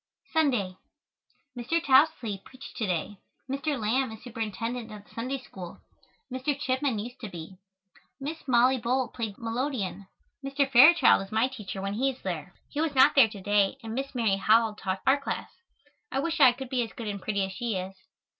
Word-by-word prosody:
Sunday. 245 - +1 0.8
Mr. 245 +8 0
Tousley 260 - +3
preached 265 +1 -12
to 220 -4 -1
day. 185 +3 -2 0.3
Mr. 275 +1 -2
Lamb 235 +3 0
is 220 - -11
Superintendent 230 0 -4
of 210 -1 -9
the - - -22
Sunday 255 +4 -3
School. 190 -8 -10 0.6
Mr. 270 +2 -1
Chipman 260 -3 0
used 245 +5 -6
to 220 - -6
be. 180 +1 -9 0.6
Miss 295 +2 -6
Mollie 255 +1 +4
Bull 250 +2 0
played 225 -4 -5
the - - -15
melodeon. 225 -5 -3 0.4
Mr. 275 0 0
Fairchild 275 - +7
is 195 - -13
my 220 +3 +2
teacher 200 -7 -7
when 195 0 -2
he 260 +6 +1
is 265 - -7
there. 180 -1 -5 0.2
He 295 - -2
was 315 -3 -1
not 260 - +7
there 260 -6 +6
to 205 -2 -9
day 205 +3 +2
and 225 -1 -5
Miss 270 +2 -4
Mary 220 -5 +2
Howell 220 +2 +4
taught 190 -2 -4
our 275 +2 +4
class. - - -4 0.6
I - - -2
wish 330 +3 -1
I 260 -3 +8
could 265 0 -8
be 255 -1 0
as 230 - -4
good 230 - -6
and 200 -1 -4
pretty 200 -1 0
as 190 - -7
she 235 +1 -3
is. 185 +1 -4
235 Hz, 190 wpm, -28 LUFS, 205-265 Hz, 0.8 s, I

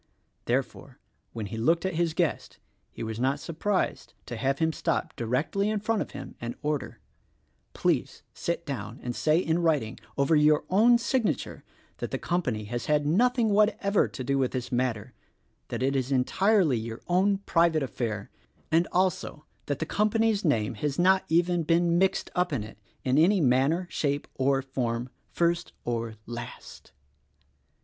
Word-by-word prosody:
Therefore, 130 +1 -2 0.3
when 110 -3 -5
he 105 +3 -6
looked 165 +10 +2
at 190 - -1
his 165 -1 0
guest 165 -9 -1 0.3
he - - -7
was 110 0 -4
not 135 +3 +1
surprised 180 +6 -2
to 120 - -6
have 135 +4 0
him 160 +1 +1
stop 165 -1 -2
directly 135 - 0
in 215 -1 0
front 215 +1 0
of - - -4
him - - -8
and 120 0 -4
order: 150 -2 -2 0.8
"Please - - -1
sit 170 0 -3
down 115 -4 -5
and 120 -1 -3
say 155 +1 +2
in 165 -1 +1
writing, 150 -10 0 0.2
over 140 +3 +3
your 150 0 +4
own 230 +5 +6
signature, 235 -1 -1 0.3
that - - -4
the - - -2
company 130 -12 -1
has 120 +4 -4
had 150 -1 +2
nothing 235 - +3
what 210 +1 +3
ever 200 0 +2
to 130 - -7
do 140 +2 0
with 130 -2 0
this 125 -2 -4
matter; 120 -2 -1 0.5
that 120 +1 -3
it 135 +1 +1
is 130 0 -1
entirely 155 - +3
your 115 +1 -6
own 190 +3 +3
private 165 -5 +2
affair; 110 -5 -4 0.4
and 165 +2 +3
also, 180 -4 0 0.2
that 145 - -1
the 160 - -2
company's 215 +3 +1
name 115 - +1
has 140 +6 -2
not 190 +2 +4
even 175 +1 +2
been 170 +1 +2
mixed 190 0 +1
up 180 -1 +1
in 130 -8 -1
it, 110 0 -11 0.2
in 130 +3 +2
any 190 +5 +5
manner, 140 +5 +2
shape 145 -1 -1
or 135 0 +1
form 125 -2 -2
— - - -43
first 170 0 +1
or 115 -2 -2
last." 120 0 -9
150 Hz, 170 wpm, -27 LUFS, 125-180 Hz, 0.8 s, own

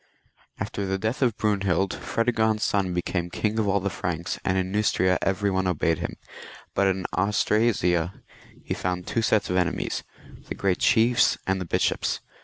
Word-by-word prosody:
After 100 -1 -3
the 95 0 0
death 110 +8 -2
of 120 -5 +2
Brunehild, 100 -3 +1
Fredegond's 110 -2 0
son 100 -4 +1
became 90 0 -2
King 110 +5 -1
of 110 - +1
all 100 0 +2
the 100 0 -2
Franks, 85 -1 -3
and 90 - +1
in 95 0 -1
Neustria 95 -3 +2
every 100 +1 +1
one 95 0 0
obeyed 85 -2 +1
him; - - -4 0.6
but 100 - +2
in 95 -1 0
Austrasia 100 -4 +1 0.4
he - - -3
found 90 -1 -3
two 115 - -1
sets 110 -3 +1
of 90 - +1
enemies, 90 -2 -1 0.5
the - - -3
great 95 -2 0
chiefs 120 +2 +4
and 95 0 0
the - - -3
bishops. - - 0
95 Hz, 170 wpm, -25 LUFS, 90-105 Hz, 0.6 s, chiefs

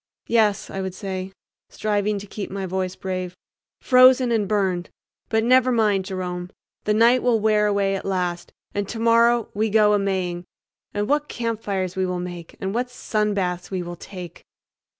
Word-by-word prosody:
"Yes," 215 -3 +2
I 195 - -3
would 190 -1 -4
say, 190 -1 -5 0.4
striving 210 -1 -1
to 200 - -7
keep 205 0 -6
my 195 0 -4
voice 185 0 -2
brave, 185 -1 -4 0.4
"frozen 255 -1 +6
and 215 -3 +1
burned; 190 -4 0 0.4
but 220 0 +2
never 255 +1 +4
mind, 210 -5 +2
Jerome, 180 -1 -4 0.4
the 210 - +2
night 235 +3 +5
will 240 -2 +2
wear 210 0 +3
away 200 -1 +1
at 195 - -4
last, 180 -2 -2 0.2
and 200 -1 -2
tomorrow 230 0 +3
we 215 +2 0
go 210 0 +4
a 205 - +3
Maying, 185 -3 -2 0.5
and 205 0 -2
what 295 +2 +1
campfires 205 -6 -3
we 190 -1 0
will 180 -1 -2
make, 175 -2 -7
and 195 0 -3
what 245 +2 0
sunbaths 205 -7 -1
we 185 -2 -3
will 175 0 -6
take!" 180 -1 -10
200 Hz, 170 wpm, -23 LUFS, 185-220 Hz, 0.5 s, frozen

